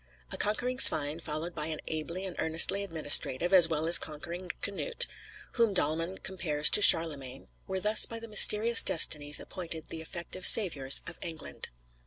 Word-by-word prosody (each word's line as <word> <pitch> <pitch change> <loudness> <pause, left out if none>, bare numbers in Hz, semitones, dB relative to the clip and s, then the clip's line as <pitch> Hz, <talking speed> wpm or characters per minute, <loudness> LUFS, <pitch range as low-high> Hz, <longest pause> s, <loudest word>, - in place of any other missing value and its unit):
A - - -8
conquering 250 +5 -5
Svein, 150 - +5
followed 160 +2 -9
by 155 -2 -7
an 155 -1 -9
ably 170 +4 -9
and 185 - -10
earnestly 170 +5 0
administrative, 165 -1 -1
as 175 -3 +5
well 160 -1 -5
as 170 +1 +7
conquering, 170 +4 -6
Knut 470 - -4 0.5
(whom 230 -5 -4
Dahlmann 165 +3 -5
compares 155 -6 -2
to - - +1
Charlemagne), 145 -8 +2 0.2
were 190 0 -8
thus 210 +3 +2
by 230 - -9
the 230 - -14
mysterious 220 +1 +4
destinies 150 -2 +1
appointed 165 -3 -12
the 160 - -11
effective 170 +2 -12
saviours 145 -11 +3
of - - -14
England. 160 -3 -11
170 Hz, 160 wpm, -25 LUFS, 155-195 Hz, 0.5 s, as